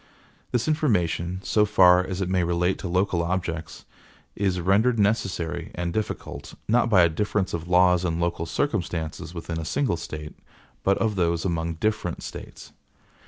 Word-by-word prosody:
This 120 Hz, +2 st, 0 dB
information, 95 Hz, -, 0 dB
so 105 Hz, -, +3 dB
far 90 Hz, -3 st, +6 dB
as 95 Hz, 0 st, -4 dB
it 95 Hz, -, 0 dB
may 90 Hz, -1 st, +1 dB
relate 85 Hz, +2 st, 0 dB
to -, -, -4 dB
local 90 Hz, 0 st, +1 dB
objects, 85 Hz, -3 st, -3 dB, 0.5 s
is 95 Hz, -2 st, 0 dB
rendered 105 Hz, +7 st, +3 dB
necessary 100 Hz, -6 st, 0 dB
and 85 Hz, 0 st, -3 dB
difficult, 110 Hz, +2 st, -4 dB
not 120 Hz, +1 st, +3 dB
by 95 Hz, -5 st, +6 dB
a -, -, +6 dB
difference 95 Hz, +3 st, -1 dB
of 85 Hz, 0 st, -4 dB
laws 90 Hz, 0 st, +4 dB
and 85 Hz, -2 st, -1 dB
local 85 Hz, -1 st, -1 dB
circumstances 85 Hz, -, -2 dB
within 85 Hz, -1 st, -4 dB
a -, -, -4 dB
single 105 Hz, -, 0 dB
State, 75 Hz, -2 st, -7 dB, 0.5 s
but 100 Hz, 0 st, +3 dB
of 110 Hz, -3 st, 0 dB
those 85 Hz, -1 st, +1 dB
among 85 Hz, -2 st, -1 dB
different 105 Hz, -1 st, -2 dB
States. -, -, -9 dB
90 Hz, 160 wpm, -25 LUFS, 85-100 Hz, 0.5 s, far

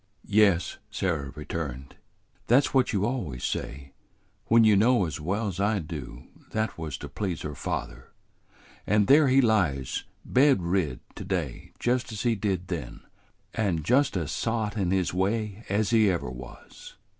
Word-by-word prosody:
"Yes," 100 Hz, -5 st, +3 dB
Sarah 80 Hz, -8 st, -2 dB
returned; 70 Hz, -3 st, -5 dB, 0.5 s
"that's 130 Hz, +4 st, +4 dB
what 130 Hz, -2 st, +3 dB
you 100 Hz, -1 st, +1 dB
always 95 Hz, -, -3 dB
say, 70 Hz, 0 st, -4 dB, 0.5 s
when 115 Hz, 0 st, +6 dB
you 110 Hz, -2 st, +6 dB
know 115 Hz, 0 st, +4 dB
as 75 Hz, -2 st, -5 dB
well 100 Hz, +6 st, -1 dB
's 95 Hz, -, -8 dB
I 105 Hz, +2 st, +2 dB
do 75 Hz, -8 st, -7 dB, 0.2 s
that -, -, -29 dB
that 110 Hz, -1 st, -1 dB
was 75 Hz, -4 st, -4 dB
to -, -, -7 dB
please 95 Hz, -6 st, -4 dB
her 75 Hz, -, -4 dB
father; -, -, -5 dB, 0.8 s
and 105 Hz, 0 st, +3 dB
there 145 Hz, +5 st, +6 dB
he 135 Hz, +1 st, +5 dB
lies 90 Hz, -, +1 dB, 0.2 s
bed 135 Hz, -7 st, +4 dB
rid 85 Hz, -7 st, 0 dB
to -, -, -7 dB
day 85 Hz, -9 st, -3 dB
just 120 Hz, -1 st, 0 dB
as 105 Hz, -, -4 dB
he 120 Hz, -2 st, +3 dB
did 95 Hz, -4 st, -2 dB
then, 85 Hz, -5 st, -5 dB, 0.5 s
and 95 Hz, -8 st, 0 dB
just 135 Hz, -, +3 dB
as 80 Hz, -4 st, -2 dB
sot 110 Hz, -2 st, -1 dB
in 95 Hz, -5 st, 0 dB
his 95 Hz, -2 st, +1 dB
way 105 Hz, +3 st, -1 dB
as 105 Hz, +3 st, +1 dB
ever 100 Hz, -, +3 dB
he -, -, -8 dB
was." 60 Hz, 0 st, -12 dB
95 Hz, 165 wpm, -27 LUFS, 80-110 Hz, 0.8 s, when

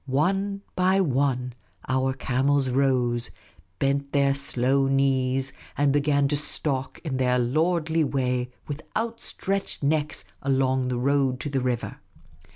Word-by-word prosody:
One 195 Hz, +9 st, 0 dB
by 185 Hz, +1 st, +3 dB
one 130 Hz, -6 st, +1 dB, 0.3 s
the 130 Hz, 0 st, +1 dB
camels 135 Hz, +1 st, +1 dB
rose, 125 Hz, -3 st, +1 dB, 0.5 s
bent 140 Hz, 0 st, 0 dB
their 140 Hz, -1 st, +3 dB
slow 135 Hz, 0 st, +2 dB
knees, 135 Hz, -1 st, +1 dB, 0.2 s
and 145 Hz, -1 st, +3 dB
began 145 Hz, -1 st, +2 dB
to 145 Hz, -, +1 dB
stalk 145 Hz, -2 st, -2 dB
in 140 Hz, -6 st, -2 dB
their 125 Hz, -1 st, +2 dB
lordly 160 Hz, +5 st, +1 dB
way 125 Hz, -3 st, -1 dB, 0.2 s
with 145 Hz, +1 st, -5 dB
out 230 Hz, +1 st, -2 dB
stretched 195 Hz, -5 st, -3 dB
necks 150 Hz, +1 st, 0 dB, 0.2 s
along 130 Hz, -1 st, +1 dB
the 125 Hz, -1 st, -1 dB
road 135 Hz, 0 st, +1 dB
to 145 Hz, -, -3 dB
the 135 Hz, -2 st, 0 dB
river. 125 Hz, -2 st, -2 dB
135 Hz, 135 wpm, -25 LUFS, 130-145 Hz, 0.5 s, by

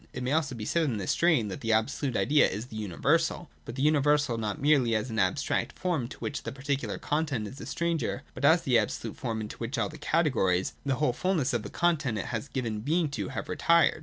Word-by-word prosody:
It 130 Hz, -, -4 dB
may 125 Hz, -, -1 dB
also 145 Hz, -4 st, +1 dB
be 110 Hz, -2 st, -5 dB
said 165 Hz, +7 st, +1 dB
in 125 Hz, -7 st, -1 dB
this 95 Hz, -3 st, -1 dB
strain 155 Hz, -11 st, +3 dB
that 95 Hz, -, -6 dB
the 115 Hz, 0 st, +1 dB
absolute 120 Hz, +4 st, 0 dB
idea 150 Hz, +1 st, +4 dB
is 105 Hz, +5 st, -4 dB
the 120 Hz, -, -11 dB
universal, 145 Hz, -, 0 dB
but 115 Hz, -, -7 dB
the 135 Hz, -, -1 dB
universal 145 Hz, -3 st, +3 dB
not 105 Hz, -3 st, -3 dB
merely 135 Hz, -5 st, +3 dB
as 110 Hz, +3 st, -1 dB
an 110 Hz, -, -1 dB
abstract 95 Hz, -2 st, 0 dB
form 170 Hz, -10 st, -1 dB
to -, -, -10 dB
which 145 Hz, -, -4 dB
the -, -, -5 dB
particular 140 Hz, +1 st, -2 dB
content 145 Hz, -8 st, -1 dB
is 130 Hz, +6 st, -10 dB
a -, -, -7 dB
stranger, 165 Hz, -5 st, -1 dB
but 130 Hz, -, -8 dB
as 160 Hz, +4 st, +5 dB
the 125 Hz, -3 st, +4 dB
absolute 110 Hz, +1 st, -3 dB
form, 115 Hz, -4 st, -3 dB
into 105 Hz, -, -7 dB
which 120 Hz, +5 st, -4 dB
all -, -, 0 dB
the 155 Hz, +1 st, -11 dB
categories, 120 Hz, -, +1 dB
the 140 Hz, -2 st, 0 dB
whole 130 Hz, -1 st, +1 dB
full 185 Hz, +9 st, 0 dB
ness 145 Hz, -4 st, 0 dB
of 120 Hz, -, +1 dB
the -, -, -7 dB
content 150 Hz, -9 st, +1 dB
it 100 Hz, -, -3 dB
has 115 Hz, +4 st, -3 dB
given 115 Hz, -6 st, -3 dB
being 155 Hz, +7 st, +1 dB
to, 145 Hz, -, -4 dB
have -, -, -5 dB
retired. 170 Hz, -2 st, +3 dB
135 Hz, 240 wpm, -28 LUFS, 115-155 Hz, -, as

